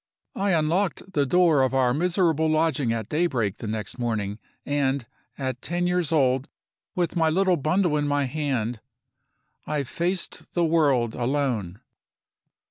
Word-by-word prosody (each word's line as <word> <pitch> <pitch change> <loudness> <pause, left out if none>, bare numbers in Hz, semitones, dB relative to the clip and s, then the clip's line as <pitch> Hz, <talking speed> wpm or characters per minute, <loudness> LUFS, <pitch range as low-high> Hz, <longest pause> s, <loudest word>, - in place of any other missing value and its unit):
I 195 -1 +1
unlocked 175 +4 0
the 145 -2 +2
door 165 -1 +4
of 130 0 +1
our 125 -2 +3
miserable 165 0 +1
lodging 155 -5 +1
at 115 -2 -2
daybreak 130 - 0
the 115 - -6
next 110 +2 -4
morning; 110 -3 -2 0.3
and, 140 -3 0 0.3
at 130 -3 -3
ten 175 +1 -2
years 180 -3 0
old, 135 -3 +2 0.5
with 175 -1 -1
my 165 -2 +3
little 185 +2 +3
bundle 165 +2 +1
in 145 0 0
my 145 0 +1
hand, 130 -5 -2 0.9
I 150 -1 -1
faced 175 +7 -3
the 175 -1 +3
world 140 -8 +2
alone. 120 -7 -1
145 Hz, 140 wpm, -25 LUFS, 125-170 Hz, 0.9 s, door